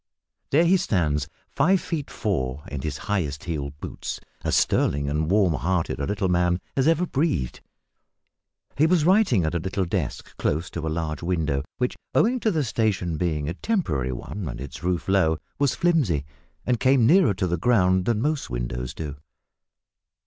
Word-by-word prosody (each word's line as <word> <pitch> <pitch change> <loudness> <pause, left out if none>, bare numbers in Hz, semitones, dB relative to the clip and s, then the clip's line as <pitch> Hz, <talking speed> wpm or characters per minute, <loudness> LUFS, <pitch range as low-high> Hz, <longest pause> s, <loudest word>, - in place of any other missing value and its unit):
There 160 +5 +4
he 185 +3 +5
stands 75 - 0 0.2
five 180 +7 +3
feet 155 -5 -4
four 75 -9 -2
in 70 -2 -4
his 75 0 -3
highest 80 -9 -1
heeled 75 -4 -4
boots - - -5 0.2
as - - +1
sterling 70 0 +2
and 75 +2 0
warm 95 -3 +3
hearted 85 +2 -1
a 70 - -2
little 100 -2 0
man 90 0 +2 0.2
as 135 +1 +2
ever 165 +2 +3
breathed. 140 - -1 1.1
He 155 +3 +4
was 165 -3 +3
writing 185 - +4
at 80 - -1
a 85 - 0
little 95 +3 -1
desk 85 - -3
close 80 +4 -1
to 80 -2 -4
a - - 0
large 80 -2 -3
window, 80 -6 0
which, 125 -1 -1 0.2
owing 250 +3 +3
to 225 - +1
the 160 -7 +1
station 105 - 0
being 75 -3 -1
a 85 - -2
temporary 85 - -1
one 90 +9 -5
and - - -6
its 70 +1 -8
roof 90 -1 -1
low, 95 -5 +3 0.2
was 140 -3 +2
flimsy, 135 - +2 0.4
and 125 -2 +1
came 130 -2 +4
nearer 165 - +5
to 95 - -1
the 85 -1 0
ground 95 -3 +3
than 115 0 +1
most 150 -1 -1
windows - - -4
do. 75 -3 -5
90 Hz, 175 wpm, -25 LUFS, -, 1.1 s, he